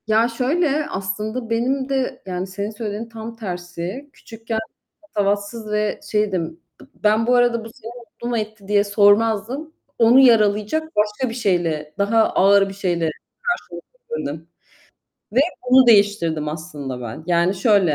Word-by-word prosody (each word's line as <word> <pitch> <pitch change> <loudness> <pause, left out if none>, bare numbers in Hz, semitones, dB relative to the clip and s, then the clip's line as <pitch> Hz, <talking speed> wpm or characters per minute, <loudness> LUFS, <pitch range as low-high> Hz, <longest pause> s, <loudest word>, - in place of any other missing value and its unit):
Ya, 220 +2 +4
şöyle, 285 +5 0
aslında 215 +5 -4
benim 260 +4 0
de, 265 -1 -1
yani, 185 0 -4
senin 200 +2 -4
söylediğinin 215 +1 -5
tam 225 0 -8
tersi, 180 +5 -6
küçükken 225 0 -5 0.4
patavatsız 205 -4 -2
ve 210 0 0
şeydim. 185 -6 -1 0.2
B - - -14 0.2
ben 215 +2 +3
bu 250 - +4
arada, 240 -2 +2
"Bu - - -8
seni 230 - -10
mutlu 235 0 -10
mu 240 - 0
etti?" 215 -2 -5
diye 205 0 +3
sormazdım. 220 +8 +2 0.3
Onu 235 +3 +6
yaralayacak 215 +2 +4
başka 210 +4 0
bir - - -5
şeyle, 170 -9 -1
daha 215 +3 +3
ağır 195 +1 +4
bir - - -7
şeyle 175 -4 -1 0.3
karşılık 175 - -3 0.3
verirdim 160 - -4 0.9
ve 250 - +4 0.3
bunu 260 0 +7
değiştirdim 200 -8 +3
aslında 150 -5 -6
ben. 120 +4 -7
Yani, 175 +1 +2
şöyle: 195 -5 +3
210 Hz, 145 wpm, -21 LUFS, 190-235 Hz, 0.9 s, bunu